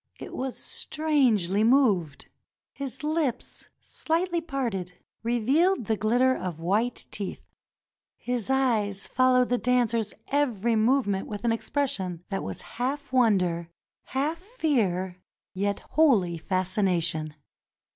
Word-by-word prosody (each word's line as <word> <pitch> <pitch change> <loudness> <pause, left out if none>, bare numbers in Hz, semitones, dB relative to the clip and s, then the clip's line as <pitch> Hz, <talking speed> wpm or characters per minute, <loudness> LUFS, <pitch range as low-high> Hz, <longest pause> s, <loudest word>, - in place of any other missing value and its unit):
It - - -8
was 260 0 -3
strangely 250 - +1
moved. 215 - +2 0.5
His 275 0 -5
lips, 300 -5 -2
shghtly 340 +1 -1
parted, 225 - -2 0.3
revealed 255 - +2
the 220 - +1
glitter 245 +5 +2
of 175 -3 -5
white 210 +8 0
teeth. 200 -3 -5 0.7
His 245 -2 -3
eyes 225 -7 +1
followed 255 -1 +3
the 245 0 +1
dancer's 235 -3 +1
every 235 -6 +1
movement 220 -3 +2
with 205 +1 -6
an 235 - +3
expression 205 - -2
that 195 - -1
was - - -5 0.2
half 280 +1 -2
wonder, 180 -9 +2 0.4
half 295 +5 -1
fear, 215 - -1 0.3
yet 200 +2 -1
wholly 205 - +3
fascination. 175 -4 0
235 Hz, 110 wpm, -27 LUFS, 190-270 Hz, 0.7 s, followed